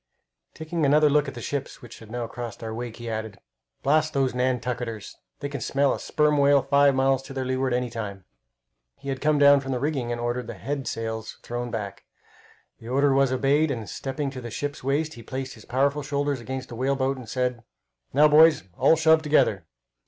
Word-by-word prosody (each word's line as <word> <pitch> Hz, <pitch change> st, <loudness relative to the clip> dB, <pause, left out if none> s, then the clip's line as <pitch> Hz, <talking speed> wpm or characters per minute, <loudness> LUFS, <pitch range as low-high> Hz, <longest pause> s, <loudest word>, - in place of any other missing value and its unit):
Taking 160 Hz, +1 st, -3 dB
another 150 Hz, +1 st, +5 dB
look 150 Hz, 0 st, +3 dB
at 140 Hz, -, -6 dB
the 120 Hz, -, -7 dB
ships 140 Hz, +1 st, -5 dB
which 120 Hz, -, -11 dB
had 110 Hz, -, -13 dB
now 120 Hz, +1 st, -3 dB
crossed 115 Hz, -1 st, -7 dB
our 110 Hz, -1 st, -4 dB
wake, 115 Hz, 0 st, -6 dB
he 120 Hz, -, -8 dB
added, 110 Hz, -2 st, -4 dB, 0.5 s
"Blast 155 Hz, +2 st, +2 dB
those 135 Hz, -2 st, +1 dB
Nantucketers! 125 Hz, -3 st, -2 dB, 0.3 s
They 140 Hz, -, -2 dB
can 140 Hz, -3 st, -6 dB
smell 140 Hz, +4 st, +1 dB
a -, -, -4 dB
sperm 150 Hz, -1 st, +1 dB
whale 140 Hz, -1 st, +5 dB
five 140 Hz, -1 st, +4 dB
miles 135 Hz, 0 st, +2 dB
to 135 Hz, -, -10 dB
their 130 Hz, -1 st, -2 dB
leeward 130 Hz, 0 st, 0 dB
any 125 Hz, -1 st, -1 dB
time." 100 Hz, -5 st, -6 dB, 0.7 s
He 140 Hz, -, -8 dB
had 135 Hz, -1 st, -3 dB
come 150 Hz, 0 st, +3 dB
down 145 Hz, 0 st, +7 dB
from 135 Hz, 0 st, -5 dB
the 125 Hz, -, -1 dB
rigging, 135 Hz, -4 st, -1 dB
and 120 Hz, -, -3 dB
ordered 120 Hz, 0 st, -2 dB
the -, -, -6 dB
head 140 Hz, -3 st, -4 dB
sails 110 Hz, -1 st, -4 dB
thrown 120 Hz, 0 st, -4 dB
back. 105 Hz, -4 st, -5 dB, 0.8 s
The 115 Hz, -, -12 dB
order 140 Hz, +2 st, +3 dB
was 135 Hz, -1 st, +3 dB
obeyed, 140 Hz, +4 st, +2 dB
and 115 Hz, -6 st, -4 dB
stepping 135 Hz, +4 st, -4 dB
to 130 Hz, -2 st, -7 dB
the 120 Hz, -, -6 dB
ship's 145 Hz, +4 st, -5 dB
waist, 150 Hz, +4 st, 0 dB
he 120 Hz, -, -11 dB
placed 130 Hz, +2 st, -5 dB
his 110 Hz, -4 st, -15 dB
powerful 140 Hz, +3 st, +1 dB
shoulders 145 Hz, -1 st, -1 dB
against 130 Hz, +2 st, -6 dB
the 120 Hz, -, -7 dB
whale 135 Hz, +3 st, 0 dB
boat, 135 Hz, 0 st, 0 dB
and 125 Hz, -4 st, -10 dB
said: 125 Hz, -2 st, -1 dB, 0.5 s
"Now, 150 Hz, +3 st, +6 dB
boys, 155 Hz, -, +6 dB, 0.2 s
all 140 Hz, +6 st, +5 dB
shove 160 Hz, 0 st, +4 dB
together!" 110 Hz, -, +2 dB
130 Hz, 210 wpm, -25 LUFS, 120-145 Hz, 0.8 s, down